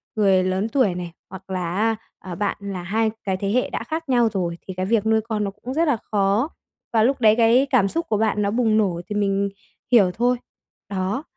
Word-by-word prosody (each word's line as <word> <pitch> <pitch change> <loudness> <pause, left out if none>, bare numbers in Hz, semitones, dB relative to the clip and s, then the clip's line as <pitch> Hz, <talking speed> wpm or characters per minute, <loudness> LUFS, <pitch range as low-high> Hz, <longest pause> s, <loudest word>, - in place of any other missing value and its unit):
người 195 -3 +3
lớn 185 +4 -1
tuổi 220 -7 +2
này, 175 -1 -5 0.2
hoặc 190 0 -11
là 180 -2 -2
á, 225 +2 +2 0.2
ờ, 185 -2 -7
bạn 205 +3 -1
là 195 -3 -5
hai 220 +4 0
cái 190 -2 -1
thế 200 +1 -2
hệ 250 +3 +1
đã - - -4
khác 320 -2 -5
nhau 240 -3 +4
rồi 175 -3 -2
thì 190 - -5
cái 185 +1 -2
việc 220 +1 +1
nuôi 220 0 +3
con 215 -1 -2
nó 200 - -2
cũng 245 +6 -7
rất 325 +3 +1
là 280 - +2
khó, 205 +7 +2 0.4
và 220 -1 +4
lúc 265 +1 +1
đấy 215 -1 +6
cái 235 +4 +4
cảm 195 - +3
xúc 330 +11 -2
của 215 - +2
bạn 215 -1 +1
nó 200 0 +1
bùng 225 -1 +2
nổ 185 -5 +1
thì 210 - -3
mình 200 -1 +1 0.4
hiểu 205 -7 +6
thôi. 245 +5 +1 0.5
Đó, 195 +7 -2
210 Hz, 230 wpm, -22 LUFS, 190-230 Hz, 0.5 s, đấy